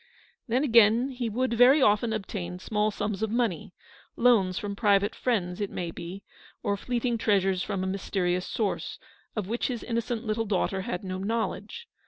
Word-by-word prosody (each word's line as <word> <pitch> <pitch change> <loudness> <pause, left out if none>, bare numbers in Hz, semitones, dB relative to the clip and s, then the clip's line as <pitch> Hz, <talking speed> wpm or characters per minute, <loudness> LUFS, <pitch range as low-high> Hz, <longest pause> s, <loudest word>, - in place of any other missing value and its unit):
Then, 250 +4 +1
again, 235 -1 +5
he 245 -3 -3
would 250 +3 0
very 250 +5 +6
often 225 -2 +3
obtain 195 -4 -4
small 210 +3 0
sums 210 -1 -3
of 220 - 0
money, 220 -8 -1 0.4
loans 205 -7 +3
from 200 -1 -3
private 205 0 +3
friends, 190 -7 -1
it 200 - -1
may 170 -2 -4
be, 180 +4 -8 0.4
or 200 - +1
fleeting 240 +2 -1
treasures 195 -4 +2
from 185 +1 -2
a - - -1
mysterious 185 -1 -1
source, 210 -4 -2 0.4
of 210 -4 -2
which 235 +3 -1
his 245 -3 -4
innocent 235 0 -2
little 220 +1 -1
daughter 190 -1 0
had 180 0 -4
no 185 -1 -4
knowledge. 220 - -3
210 Hz, 170 wpm, -27 LUFS, 190-235 Hz, 0.4 s, very